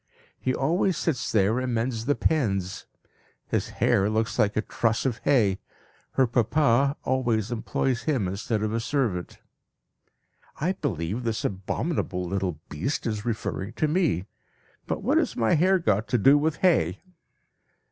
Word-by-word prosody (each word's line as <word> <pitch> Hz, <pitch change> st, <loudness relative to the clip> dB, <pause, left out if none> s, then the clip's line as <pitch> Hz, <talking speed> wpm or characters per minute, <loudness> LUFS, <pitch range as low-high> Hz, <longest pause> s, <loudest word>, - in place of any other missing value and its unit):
He 130 Hz, -, 0 dB
always 170 Hz, +5 st, +1 dB
sits 150 Hz, -7 st, -1 dB
there 110 Hz, +3 st, +2 dB
and 130 Hz, -2 st, -1 dB
mends 115 Hz, 0 st, -1 dB
the 145 Hz, -, +3 dB
pens. 100 Hz, -, -1 dB, 0.6 s
His -, -, -1 dB
hair 100 Hz, +2 st, +2 dB
looks 110 Hz, +1 st, -1 dB
like 105 Hz, +1 st, +2 dB
a 110 Hz, -, +1 dB
truss 115 Hz, +1 st, 0 dB
of 125 Hz, -3 st, -1 dB
hay. 105 Hz, -9 st, +3 dB, 0.5 s
Her 135 Hz, -, +4 dB
papa 135 Hz, +3 st, +2 dB
always 120 Hz, -4 st, 0 dB
employs 120 Hz, +1 st, -1 dB
him 130 Hz, -11 st, 0 dB
instead 105 Hz, +3 st, -2 dB
of 110 Hz, 0 st, -1 dB
a 115 Hz, -, 0 dB
servant." 115 Hz, -8 st, -2 dB, 1.2 s
(I 170 Hz, +6 st, +1 dB
believe 110 Hz, -, -3 dB
this 115 Hz, -2 st, -2 dB
abominable 95 Hz, -, -2 dB
little 90 Hz, -3 st, -2 dB
beast 85 Hz, -, -3 dB
is 105 Hz, -3 st, -2 dB
referring 110 Hz, -2 st, -3 dB
to 155 Hz, -, 0 dB
me. 155 Hz, -, +1 dB, 0.6 s
But -, -, -3 dB
what -, -, +3 dB
has -, -, -1 dB
my 115 Hz, -2 st, +2 dB
hair 185 Hz, +4 st, +4 dB
got 110 Hz, -, 0 dB
to 125 Hz, -, +1 dB
do 135 Hz, +6 st, +6 dB
with 155 Hz, +1 st, +1 dB
hay?) 95 Hz, -, +3 dB
115 Hz, 150 wpm, -26 LUFS, 100-140 Hz, 1.2 s, do